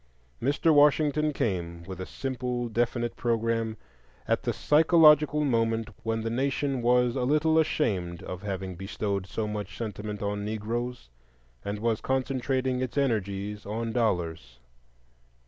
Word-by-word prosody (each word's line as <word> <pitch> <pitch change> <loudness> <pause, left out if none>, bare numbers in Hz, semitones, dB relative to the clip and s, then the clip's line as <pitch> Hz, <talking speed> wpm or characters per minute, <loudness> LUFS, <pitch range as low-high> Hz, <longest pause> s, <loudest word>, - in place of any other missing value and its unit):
Mr. 145 +5 +3
Washington 150 +1 +4
came, 85 - -2
with 95 0 -7
a 95 - -5
simple 125 -2 -3
definite 120 +1 -1
programme, 115 -1 0 0.5
at - - +1
the - - -1
psychological 150 -1 +5
moment 115 -3 +1
when 115 0 -1
the 115 - -2
nation 135 +1 0
was 125 0 +3
a 130 - -1
little 155 +5 +3
ashamed 95 - 0
of 90 0 -6
having 95 -2 -4
bestowed 100 +1 -3
so 110 +1 -3
much 105 -1 -5
sentiment 105 -2 -5
on 100 0 -2
Negroes, 110 - -4 0.5
and 100 +1 -3
was 115 0 0
concentrating 130 -1 0
its 130 +2 -3
energies 105 -5 -1
on 115 +3 -3
Dollars. 85 - -1
115 Hz, 130 wpm, -28 LUFS, 105-130 Hz, 0.5 s, psychological